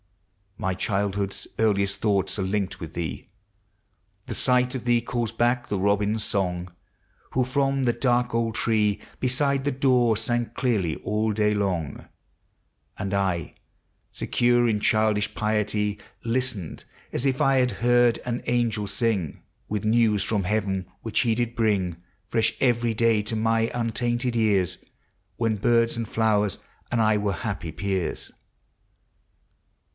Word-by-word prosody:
My 95 -3 -1
childhood's 100 0 -1
earliest 100 -3 +2
thoughts 100 -3 +1
are - - -1
linked 95 0 -2
with 80 -1 -7
thee; 80 -6 -5 1.0
The - - -4
sight 125 0 +3
of 130 - -4
thee 120 -1 +4
calls 120 -1 -2
back 120 +1 0
the 100 - 0
robin's 105 +2 +1
song, 90 -3 -1 0.6
Who, 130 - +2
from 135 +1 +1
the 120 - +3
dark 120 0 +1
old 115 -1 0
tree 105 -3 +1 0.2
Beside 135 +2 +1
the 145 - +2
door, 125 -4 +3
sang 120 0 -1
clearly 105 - 0
all 105 +1 -1
day 105 0 +2
long; 90 -7 -2 0.9
And 95 0 -3
T, 95 -5 -1 0.6
secure 120 0 +2
in 105 -2 +1
childish 110 -1 +2
piety, 105 -1 0 0.2
Listened 120 -7 -2 0.3
as 125 - -1
if 135 -1 +1
I 135 -1 +4
heard 120 +1 +3
an 120 0 -2
angel 115 -4 0
sing 100 - -1 0.2
With 105 0 -3
news 110 -2 +3
from 105 -3 0
heaven, 95 -2 -1
which 115 - 0
he 120 -3 +2
did 120 0 -2
bring 100 -7 +1 0.3
Fresh 115 0 +1
every 120 -2 +2
day 115 -1 +3
to 110 +2 -3
my 115 +1 +1
untainted 120 +1 -1
ejus. 100 -6 +2 0.6
When 115 -2 +1
birds 115 +2 +2
and 115 -1 -3
flowers 105 -3 +1 0.3
and 120 -1 +2
I 110 -1 +3
were 105 -1 0
happy 100 -6 -4
peers. 95 +2 -3
110 Hz, 140 wpm, -25 LUFS, 100-120 Hz, 1.0 s, thee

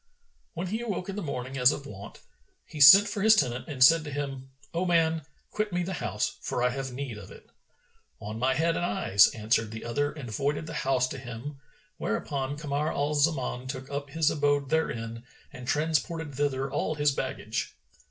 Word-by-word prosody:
When 170 +2 -3
he 215 +5 -3
awoke 200 -5 -4
in 195 - -4
the 205 - -3
morning 135 -4 -4
as 125 +2 +6
of 140 - -6
wont, 100 -7 -10 0.4
he 150 - -7
sent 195 +9 +10
for 205 0 -3
his 220 +2 +7
tenant 125 - 0
and 135 -4 +2
said 165 +4 +7
to 150 - -6
him, 135 -2 -5 0.2
"O 170 +2 0
man, 165 -2 +2 0.3
quit 215 -1 -2
me 175 0 0
the 190 +2 -4
house, 105 -3 -2
for 120 - -2
I 125 - +4
have 135 +1 -4
need 125 -4 -5
of 100 - -11
it." - - -14 0.7
"On 105 +2 -6
my 130 +2 +2
head 165 +1 +1
and - - -2
eyes," 175 - +4
answered 110 0 +1
the 110 +1 -8
other 145 +5 -1
and 135 -7 -8
voided 145 +7 -1
the 160 - -7
house 135 -4 +1
to 135 - -6
him, 125 +3 -8 0.4
whereupon 140 -1 -2
Kamar 150 0 -2
al 145 +1 -1
Zaman 140 -4 0
took 130 0 -6
up 140 0 -4
his 160 +1 +1
abode 145 -2 +1
therein 115 -7 -1 0.3
and 125 -1 -9
transported 160 +1 -1
thither 135 -1 -1
all 155 - -1
his 145 -1 +2
baggage. 135 - -4
145 Hz, 195 wpm, -28 LUFS, 125-160 Hz, 0.7 s, sent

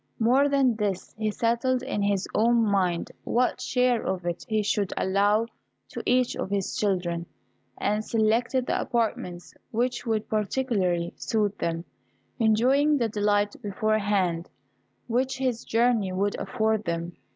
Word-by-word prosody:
More 260 +5 +4
than 270 -5 +2
this, 200 -4 -2
he 215 0 -1
settled 235 +4 0
in 210 -5 -2
his 200 -1 0
own 235 +1 +3
mind 185 -5 0
what 250 +1 +1
share 250 -2 +1
of 185 -2 -3
it 175 -1 -3
he 215 -1 +1
should 200 -1 0
allow 205 +3 +2 0.4
to - - -6
each 250 0 +2
of - - -3
his 200 -1 -1
children, 175 -4 -1 0.5
and 210 +1 0
selected 230 +4 +1
the - - 0
apartments 210 -7 -2 0.2
which 240 +2 -1
would 220 -1 0
particularly 205 -6 0
suit 210 -2 0
them, 165 0 -2 0.5
enjoying 260 +7 +3
the 235 -4 0
delight 205 0 +1
beforehand 200 -4 0 0.6
which 255 +3 0
his 255 -3 -1
journey 230 -4 +2
would 200 +2 0
afford 220 -3 0
them. 170 0 -3
215 Hz, 140 wpm, -26 LUFS, 195-240 Hz, 0.6 s, More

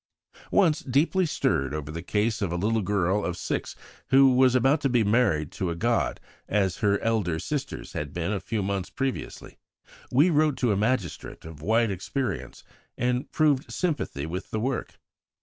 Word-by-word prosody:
Once, 165 -7 +4
deeply 160 +8 +1
stirred 70 - 0
over 75 -1 -5
the 85 +2 -5
case 105 +5 0
of 95 -4 -1
a - - -1
little 110 +5 +1
girl 100 0 +1
of 90 -1 -3
six - - -3 0.3
who 135 0 +6
was 130 0 +4
about 135 +4 +3
to 140 - +1
be 120 -3 +3
married 100 -8 +2
to 95 -2 -3
a 85 - -2
god 115 +6 0 0.3
as 95 -4 +1
her 100 -3 +2
elder 105 -8 0
sisters 140 - -4
had 75 -1 -4
been 85 +4 -2
a 100 - -1
few 110 -1 -3
months 95 -1 -2
previously, 135 -1 -4 0.5
we 145 +8 +4
wrote 150 -2 +2
to 120 -4 +1
a - - +2
magistrate 105 - -2
of 80 -2 -10
wide 110 +5 +2
experience 120 +8 -4 0.3
and 125 +1 -1
proved 150 -2 +2
sympathy 150 - -2
with 90 +4 -5
the 110 - -2
work. 130 +3 -3
110 Hz, 175 wpm, -26 LUFS, 90-130 Hz, 0.5 s, who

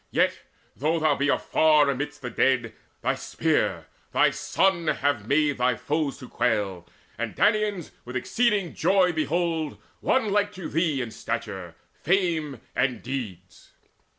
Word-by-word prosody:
Yet, - - +1 0.4
though 155 +5 0
thou 155 -2 +3
be 140 +1 0
afar 155 0 +4
amidst 145 +1 -3
the 125 - -4
dead, 120 -4 +1 0.3
Thy - - +2
spear, - - -1 0.3
thy - - +4
son, 190 -4 +1
have 140 -8 0
made 145 0 +2
thy 125 0 +2
foes 150 +3 -2
to 125 - -10
quail; 105 -8 -1 0.3
And - - -3
Danaans 210 -4 +1
with 125 +1 -9
exceeding 210 - +1
joy 185 +1 +3
behold 160 -1 -1 0.2
One 225 -6 +1
like 205 0 +1
to 185 -3 -6
thee 155 -5 +1
in 115 - -7
stature, - - -5 0.3
fame 160 - 0
and 125 -2 0
deeds." 105 -9 -7
150 Hz, 140 wpm, -26 LUFS, 125-175 Hz, 0.4 s, afar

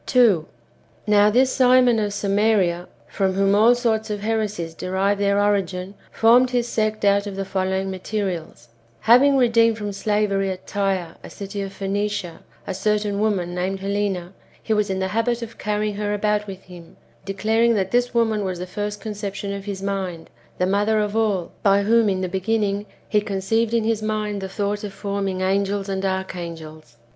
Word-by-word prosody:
2. 220 - +4 0.6
Now 210 0 +5
this 255 +4 +3
Simon 250 -2 +5
of 205 -1 -1
Samaria, 200 -3 +1 0.2
from 190 -2 0
whom 195 +1 +2
all 225 +4 +5
sorts 225 -2 0
of 205 -1 -3
heresies 210 -6 -2
derive 190 +4 -1
their 200 0 +2
origin, 195 -2 0 0.2
formed 245 +3 +5
his 245 -1 0
sect 215 -2 -1
out 200 0 +3
of 200 - -6
the 195 0 -3
follow 190 0 -1
ing 190 0 -3
materials: 185 - -4 0.2
— 115 - -34
Having 270 +4 +5
redeemed 230 -3 +4
from 205 -2 -4
slavery 200 -1 0
at 185 -1 -6
Tyre, 190 -4 -2
a - - -9
city 200 0 -6
of 195 -1 -5
Phoenicia, 200 -2 -3 0.3
a - - -3
certain 205 +1 0
woman 195 -5 0
named 190 +2 -2
Helena, 195 -2 -2 0.3
he 220 - 0
was 210 -1 +1
in 190 - -1
the 190 0 -1
habit 230 +3 0
of 230 0 -10
carrying 210 0 -1
her 210 0 -1
about 210 0 0
with 190 -1 -8
him, 175 -2 -14 0.3
declaring 220 +4 +1
that 190 -2 -1
this 245 0 +2
woman 225 -3 +1
was 185 -2 -3
the 180 - -5
first 205 +3 -5
conception 200 -2 -5
of 200 0 -6
his 195 -2 -5
mind, 190 -4 -4 0.3
the 180 - +1
mother 205 +3 +2
of 210 0 -1
all, 205 -6 0
by 200 0 +4
whom, 225 +1 +4
in 190 -1 -1
the 185 - -1
beginning, 200 +2 -1 0.2
he 210 - +2
conceived 210 +3 0
in 230 - +2
his 220 -1 0
mind 215 -1 -2
[the 190 - -5
thought] 205 +1 -2
of 205 -2 -5
forming 195 -2 -3
angels 195 +1 0
and 195 -1 -3
archangels. 170 -8 -5
200 Hz, 185 wpm, -22 LUFS, 190-215 Hz, 0.6 s, Now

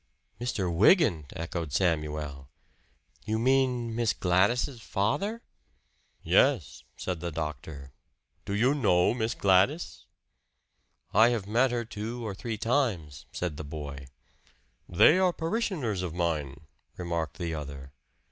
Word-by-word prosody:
"Mr. 105 -7 -2
Wygant?" 100 - +4
echoed 85 -2 -4
Samuel. 75 -4 -1 0.7
"You 110 +1 -1
mean 125 -1 +1
Miss 115 -2 +1
Gladys's 115 +8 +1
father?" 195 - -1 0.8
"Yes," - - +2
said 90 -3 -3
the 85 +1 -4
doctor. 75 -3 -6 0.5
"Do 100 - -3
you 125 +6 +3
know 100 -10 +3
Miss 115 -1 -2
Gladys?" 100 - +2 1.1
"I 115 +2 +6
have 115 -5 -1
met 120 +6 +2
her 120 -1 -2
two 115 +2 -5
or 105 - -3
three 110 +3 -5
times," 110 - -1
said 85 -5 -3
the 80 - -5
boy. 70 -2 -7 0.8
"They 110 - +6
are 185 -1 +4
parishioners 165 - -2
of 90 -3 -4
mine," 75 -5 -2 0.4
remarked 85 -4 -3
the 85 -3 -3
other. 70 -3 -7
95 Hz, 120 wpm, -28 LUFS, 80-120 Hz, 1.1 s, I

